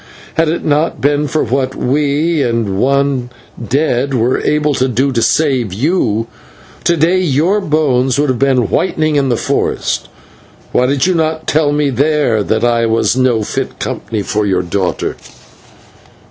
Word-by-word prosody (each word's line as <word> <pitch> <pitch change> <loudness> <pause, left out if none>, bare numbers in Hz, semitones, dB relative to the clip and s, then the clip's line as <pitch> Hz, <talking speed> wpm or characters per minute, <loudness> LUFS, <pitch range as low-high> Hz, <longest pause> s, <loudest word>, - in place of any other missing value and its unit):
Had 160 0 +1
it 170 - -2
not 150 +2 +1
been 145 +1 +1
for 155 +3 0
what 130 +2 -1
we 150 +4 0
and 115 -6 -1
one 140 -1 +1 0.3
dead 135 +1 0
were 120 +2 +1
able 150 0 +1
to 130 -1 +1
do 130 +3 0
to 115 -3 0
save 130 -8 +1
you, 115 - 0 0.6
to 170 - +2
day 170 +4 +2
your 175 +5 +1
bones 135 -6 +1
would 145 0 +1
have 130 - -1
been 130 -7 +1
whitening 155 -1 0
in 140 -2 +1
the 120 - +1
forest. - - -1 0.6
Why 125 - +2
did 140 0 +1
you 185 - +2
not 160 -1 -1
tell 150 -1 +1
me 145 -1 +1
there 140 -4 +1
that 110 +2 -1
I 115 -1 +2
was 115 +2 +1
no 125 -4 +1
fit - - -4
company 110 -3 -4
for 105 +2 -1
your 95 -3 0
daughter?" 90 +1 -2
135 Hz, 160 wpm, -14 LUFS, 120-150 Hz, 0.6 s, to